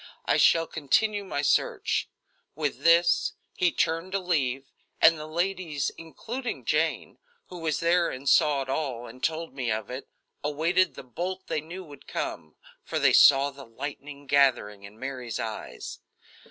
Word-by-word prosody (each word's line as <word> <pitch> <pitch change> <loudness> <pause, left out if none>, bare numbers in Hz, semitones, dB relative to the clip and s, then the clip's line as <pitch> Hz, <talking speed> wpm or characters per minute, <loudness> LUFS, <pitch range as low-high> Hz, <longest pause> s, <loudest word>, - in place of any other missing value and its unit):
I - - +3
shall 165 0 +5
continue 200 +8 +1
my 145 -7 -3
search." 145 - +1 0.5
With 150 -2 -2
this, 170 +1 +4 0.2
he 180 -1 +2
turned 165 +5 -1
to 195 - +1
leave, 135 -7 -1 0.3
and 165 - +7
the 155 0 -7
ladies, 170 -3 -1
including 235 +10 -6
Jane, - - 0 0.3
who 180 - -8
was 160 -3 -1
there 170 +1 +3
and 130 +2 -7
saw 145 -2 +4
it - - -13
all 130 -4 -2
and 130 +1 -12
told 160 -2 -1
me 125 -4 -2
of 110 +3 -3
it, 130 +2 -7 0.3
awaited 160 +2 +1
the - - -9
bolt 180 +9 -5
they 155 - -2
knew 175 +5 -8
would 145 -5 -14
come, 80 -1 -5 0.3
for - - -3
they - - +4
saw 140 0 +7
the 140 0 -12
lightning 140 +4 -8
gathering 130 -8 +2
in 100 +2 -13
Mary's 130 -3 -5
eyes. 110 -1 -6
150 Hz, 160 wpm, -27 LUFS, 135-170 Hz, 0.5 s, and